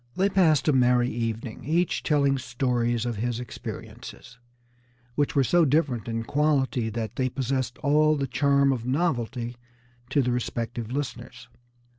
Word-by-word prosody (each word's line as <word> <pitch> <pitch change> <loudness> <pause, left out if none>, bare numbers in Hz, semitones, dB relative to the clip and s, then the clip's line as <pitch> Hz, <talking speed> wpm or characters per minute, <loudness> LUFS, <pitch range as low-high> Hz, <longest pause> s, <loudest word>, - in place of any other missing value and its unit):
They 195 +2 +2
passed 165 -7 +3
a 150 - +4
merry 125 -1 +3
evening, 115 0 -4
each 170 +4 0
telling 140 -3 +2
stories 120 -2 -1
of 120 -3 -3
his 120 +2 -2
experiences, 120 0 -9 0.7
which 145 +2 0
were 140 - +4
so 175 +7 +3
different 140 -7 +1
in 115 0 -2
quality 140 -4 +1
that 110 0 -5
they 130 -1 +1
possessed 130 -1 -2
all 155 +2 +4
the 140 - -1
charm 140 0 +2
of 120 -3 -4
novelty 125 -4 -1 0.5
to 140 - +2
the 125 - 0
respective 120 -1 -3
listeners. 125 -2 -5
125 Hz, 145 wpm, -26 LUFS, 120-145 Hz, 0.7 s, a